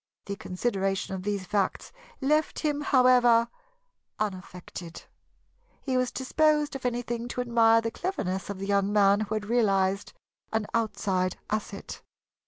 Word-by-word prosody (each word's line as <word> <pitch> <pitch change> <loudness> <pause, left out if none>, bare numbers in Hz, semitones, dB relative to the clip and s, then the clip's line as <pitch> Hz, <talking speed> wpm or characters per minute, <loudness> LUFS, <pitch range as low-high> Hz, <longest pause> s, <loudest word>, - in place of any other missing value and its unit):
The 200 - -4
consideration 195 -1 -2
of 190 - -4
these 200 -1 -2
facts 200 0 -1 0.3
left 305 +3 +1
him, 295 -2 0
however, 250 -4 +5 0.7
unaffected. 185 -4 -6 0.8
He 265 -2 -2
was 255 -1 +1
disposed, 300 +2 +1
if 255 -2 -2
anything, 240 -1 -3
to 250 - -3
admire 230 -2 +4
the 230 0 -3
cleverness 195 - -3
of 200 - -4
the 195 - -5
young 200 0 +1
man 200 -1 +4
who 215 0 -2
had 215 -1 -3
realized 200 -4 +1 0.4
an 220 -1 0
outside 190 -5 0
asset. 205 -2 -4
215 Hz, 135 wpm, -27 LUFS, 195-245 Hz, 0.8 s, however